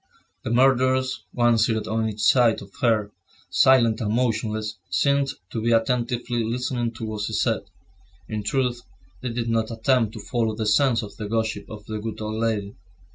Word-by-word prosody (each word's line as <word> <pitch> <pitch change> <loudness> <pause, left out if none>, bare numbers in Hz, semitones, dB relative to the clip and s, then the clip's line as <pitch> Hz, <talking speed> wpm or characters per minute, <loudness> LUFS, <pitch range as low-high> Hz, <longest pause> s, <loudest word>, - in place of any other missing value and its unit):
The - - -3
murderers, 130 +1 +2
one 120 -1 +3
seated 110 -1 +1
on 110 0 0
each 105 0 -6
side 115 -1 +4
of 100 - -15
her, 110 -4 +2 0.4
silent 120 -4 +4
and 105 -2 -1
motionless, 110 -3 -1
seemed 140 +10 +2 0.2
to 115 - -3
be 115 +1 +2
attentively 120 +1 0
listening 120 +1 -2
to 115 -1 -6
what 110 -1 -4
she 105 - -3
said. - - 0 0.6
In 110 -1 -3
truth 120 +2 -1 0.4
they 125 - -3
did 115 0 -3
not 115 -1 +1
attempt 115 -1 +1
to 110 - -7
follow 115 0 -1
the 110 - -3
sense 115 +3 +3
of 100 - -9
the 105 -2 -5
gossip 110 -2 -2
of 105 -1 -9
the 110 -1 -4
good 110 +1 -5
old 110 +1 -3
lady. 105 -3 -1
115 Hz, 180 wpm, -24 LUFS, 110-120 Hz, 0.6 s, side